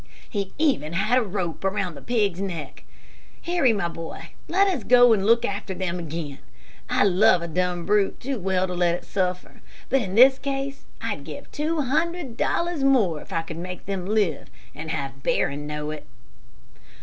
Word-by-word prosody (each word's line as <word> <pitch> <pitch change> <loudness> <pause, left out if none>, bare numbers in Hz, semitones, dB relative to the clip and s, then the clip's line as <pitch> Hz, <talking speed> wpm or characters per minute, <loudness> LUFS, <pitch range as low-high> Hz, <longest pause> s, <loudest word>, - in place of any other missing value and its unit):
"He 200 -4 -3
even 270 - +1
had 215 +8 +3
a - - +1
rope 185 -6 -3
around 195 -2 -1
the 140 - -11
pig's 205 -6 0
neck. 170 -8 -5 0.6
Harry, 340 -8 +3
my 200 -5 0
boy, 165 0 -8 0.2
let 385 +4 +4
us 350 - -1
go 245 0 +7
and 200 -2 +1
look 230 +1 +4
after 200 -1 -3
them 180 -1 -2
again. 155 -4 -5 0.5
I - - +3
love 190 -2 +4
a - - -3
dumb 175 +1 -1
brute 205 -1 +2
too 265 -1 -3
well 185 0 +1
to 180 - -4
let 175 -1 +2
it - - -8
suffer, 180 -2 -3 0.3
but 270 +1 +3
in 190 -3 -4
this 265 +3 +7
case 275 0 -4 0.2
I'd - - -3
give - - -9
two 310 +1 -1
hundred 310 0 -1
dollars 340 +3 0
more 215 - +3
if - - -14
I 165 - -1
could 160 0 -8
make 180 +1 -6
them 190 -2 -3
live 210 -4 0 0.2
and 160 +2 -7
have 135 -2 -4
Barron 145 +2 0
know 150 0 -4
it." 155 - -8
195 Hz, 185 wpm, -24 LUFS, 170-250 Hz, 0.6 s, go